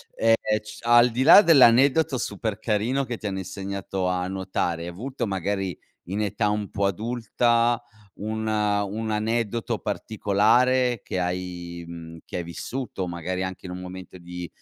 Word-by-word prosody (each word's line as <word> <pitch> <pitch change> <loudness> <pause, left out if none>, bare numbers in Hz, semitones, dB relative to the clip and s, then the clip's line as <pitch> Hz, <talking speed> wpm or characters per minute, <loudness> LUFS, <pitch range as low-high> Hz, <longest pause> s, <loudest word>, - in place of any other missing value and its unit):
Ehm, 115 0 +4 0.3
c 110 0 -11
al 120 +1 +6
di 125 +3 0
là 165 +7 +10
dell'aneddoto 140 - +5
super 105 0 -3
carino 115 +5 0
che 120 -2 -4
ti - - -11
hanno 95 -2 -2
insegnato 95 0 -4
a 90 0 -1
nuotare, 95 -3 -2
hai 85 - -5
avuto 120 +8 -4
magari 95 -1 -2 0.3
in 100 +4 -2
età 105 0 0
un 105 -1 -2
po' 100 -1 -1
adulta 120 +3 +1 0.3
un, 110 +1 -4
ehm, 105 -1 +1
un 110 0 -3
aneddoto 115 +1 -1
particolare 115 +4 +2
che 95 - -3
hai, 90 -1 -4
mhmm, 85 -1 -9
che - - -6
hai 85 - -2
vissuto, 95 - -5
magari 85 +2 -3
anche 95 0 -5
in 90 - -6
un 90 - -6
momento 90 0 -9
di 90 0 -7
105 Hz, 160 wpm, -25 LUFS, 90-115 Hz, 0.3 s, là